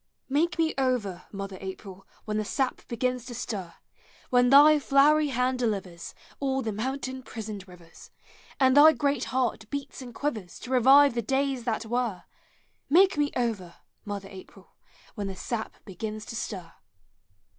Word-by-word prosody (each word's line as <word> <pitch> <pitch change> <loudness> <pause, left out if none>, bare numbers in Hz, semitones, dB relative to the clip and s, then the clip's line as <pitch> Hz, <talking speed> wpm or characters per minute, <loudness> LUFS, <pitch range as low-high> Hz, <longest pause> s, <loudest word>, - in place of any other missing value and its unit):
Make 315 +4 +1
me 325 -1 +1
over, 240 -9 -1
mother 195 -1 -6
April, 190 0 -9 0.2
When 210 0 -2
the 215 - 0
sap 260 +5 -2
begins 250 +1 -2
to 245 - -8
stir! 195 -8 -5 0.6
When 245 0 +4
thy 295 +3 +8
llowery 295 +2 +5
hand 255 0 0
delivers 195 -7 -3 0.2
All 270 -1 -1
the 220 - -2
mountain 260 +4 -4
prisoned 215 -4 -7
rivers, 175 -2 -15 0.5
And 260 -1 +4
thy 305 +2 +8
great 280 -1 0
heart 240 -4 -2
beats 280 -1 -6
and 250 -2 -9
quivers 220 -12 -4
To 250 - -8
revive 270 +3 +6
the 235 - -1
days 265 +1 -1
that 230 -2 -2
were, 230 -5 -2 0.7
Make 375 +6 +5
me 295 -1 +1
over, 210 -8 -2 0.3
mother 200 -2 -6
April, 190 -1 -14 0.4
When 205 -3 -4
the 190 - -5
sap 220 +3 -4
begins 215 +2 -6
to - - -8
stir! 190 -7 -6
240 Hz, 155 wpm, -27 LUFS, 205-270 Hz, 0.7 s, thy